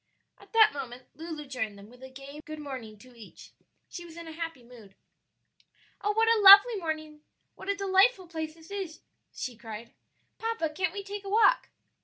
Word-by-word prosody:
At - - -19
that 440 -1 +6
moment 255 -3 -7
Lulu 315 0 -7
joined 235 -6 -4
them 200 +1 -13
with 250 +3 -18
a 260 - -10
gay 275 +3 -11
good 310 -1 -8
morning 260 -8 -8
to 250 +4 -17
each; 225 -3 -14 0.4
she 350 - -8
was 335 -1 -13
in 335 -1 -9
a - - -7
happy 325 -5 -6
mood. 230 -5 -16 1.1
"Oh, 415 - +2
what 450 +1 +2
a 455 -1 +4
lovely 400 +4 +10
morning! 310 -3 -5 0.3
what - - -10
a 400 - +1
delightful 390 +1 +3
place 320 -2 -6
this 330 +3 -17
is!" 385 -6 -6 0.3
she 250 -2 -6
cried. 225 0 -9 0.5
"Papa, 450 -8 -2
can't 360 +2 -2
we 400 0 -5
take 405 +1 -7
a 395 - -7
walk?" 450 +4 +4
320 Hz, 190 wpm, -28 LUFS, 255-395 Hz, 1.1 s, lovely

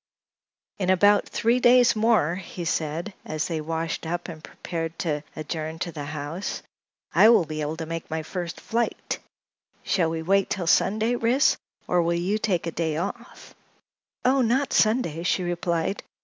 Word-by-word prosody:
"In 185 -2 0
about 205 +2 +4
three 235 +2 +2
days 245 -1 +6
more," 215 -7 +3
he 180 -1 -6
said, 165 +4 -2
as 155 -1 -3
they 160 -3 -2
washed 165 +1 -3
up 175 +2 -3
and 160 -1 -9
prepared 165 -1 -5
to 150 -4 -1
adjourn 155 +1 -4
to 170 - -3
the 150 -3 -6
house, 150 +5 -5 0.5
"I 220 - +7
will 225 -7 +5
be 155 0 -4
able 150 +2 -3
to 165 - -4
make 165 0 -5
my 160 0 -2
first 175 0 -5
flight. 235 +1 -2 0.6
Shall 175 -5 +1
we 160 0 -3
wait 195 +3 +2
till 185 -4 -2
Sunday, 220 +7 +3
Ris, 245 +5 +3 0.3
or 180 - +3
will 170 0 +1
you 190 +5 0
take 185 -6 0
a 165 - -2
day 160 -2 -1
off?" 205 +8 -6 0.7
"Oh, 265 +1 +4
not 255 +4 +1
Sunday," 215 -8 +2
she 180 +1 0
replied. 175 +1 -1
175 Hz, 165 wpm, -25 LUFS, 160-215 Hz, 0.7 s, I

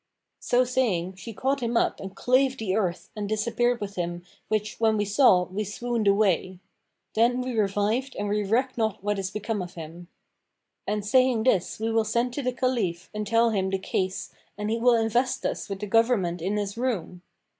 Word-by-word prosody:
So 245 +1 +2
saying, 210 -8 0
she 230 +5 -8
caught 270 +6 -1
him 235 0 0
up - - +1
and 195 0 -8
clave 260 +1 +2
the 195 -5 -1
earth 185 -5 -2
and 205 -1 -4
disappeared 235 +3 +1
with 200 -1 -6
him 175 0 -3 0.2
which 215 -1 -2
when 220 -1 +3
we 210 - +1
saw, 205 -3 +5
we 195 +4 -3
swooned 225 +2 -2
away. 195 -2 +2 0.6
Then 240 +3 +3
we 250 -1 -3
revived 215 +5 0
and 205 - -2
we 210 +1 0
reck 250 +6 +1
not 220 -3 -1
what 205 -1 0
is 190 -1 -2
become 210 0 -3
of 180 0 -7
him.' 165 +1 -9 0.8
And 210 -1 -1
saying 255 0 +3
this 200 -7 +1
we 225 +1 -1
will 225 0 +3
send 235 +3 0
to 285 - -3
the 255 -1 0
Caliph 235 -9 -1
and 210 0 -3
tell 230 +2 +3
him 190 -3 0
the 195 - 0
case 190 0 -2 0.3
and 210 +1 -2
he 230 - 0
will 245 +1 +5
invest 235 +3 +1
us - - -2
with 195 -1 -5
the - - -2
government 205 -6 +2
in 195 +5 -1
his 205 +2 -3
room. 185 -8 -2
215 Hz, 200 wpm, -26 LUFS, 195-240 Hz, 0.8 s, saw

